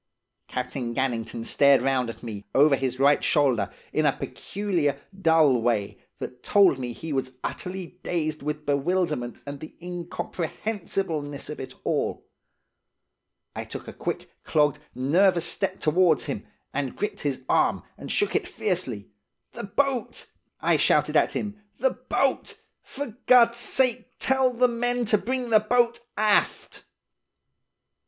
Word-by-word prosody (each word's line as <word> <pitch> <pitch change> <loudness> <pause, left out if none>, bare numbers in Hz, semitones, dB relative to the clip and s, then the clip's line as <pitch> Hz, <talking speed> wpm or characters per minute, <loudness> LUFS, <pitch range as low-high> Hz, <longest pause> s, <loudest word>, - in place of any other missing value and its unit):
"Captain 125 -1 -4
Gannington 115 -3 -2
stared 140 -2 +4
round 130 -3 +1
at 115 - -9
me, 105 -4 -6
over 145 +1 +6
his 130 -1 -2
right 140 +1 +4
shoulder, 130 -9 +2 0.2
in - - +2
a - - +4
peculiar, 175 -9 -2 0.2
dull 160 -7 +4
way, 110 -4 0 0.2
that 125 0 -7
told 195 -9 +4
me 125 -1 -3
he 155 +6 -6
was 130 -1 -2
utterly 180 -2 -5
dazed 155 -3 -2
with 150 +1 -4
bewilderment 145 -3 0
and 140 0 -6
the 155 - -10
incomprehensibleness 175 -3 -3
of 150 - -7
it 130 - -7
all. - - -1 1.3
I - - -3
took - - -8
a - - -7
quick, - - -4
clogged, 150 -1 +2 0.2
nervous 170 +7 +3
step 195 -1 0
towards 160 -1 +3
him, - - -5 0.3
and 135 -2 -2
gripped 210 - -3
his 135 -3 -2
arm, - - +2
and - - -7
shook 415 - +1
it - - +1
fiercely. 135 - -2 0.4
'The - - -6
boat!' 260 +4 -1 0.4
I - - +3
shouted - - +3
at - - +3
him. 210 0 -4 0.2
'The 265 +2 +2 0.2
boat! 270 -1 0 0.2
For 260 -5 -7
God's 235 -2 +6
sake, 245 +1 +2
tell 265 -1 +2
the 250 +1 +3
men 245 0 0
to 210 -1 +4
bring 250 0 -2
the 215 - +7
boat 235 +2 +2 0.2
aft! 210 -1 +1
160 Hz, 140 wpm, -26 LUFS, 135-210 Hz, 1.3 s, the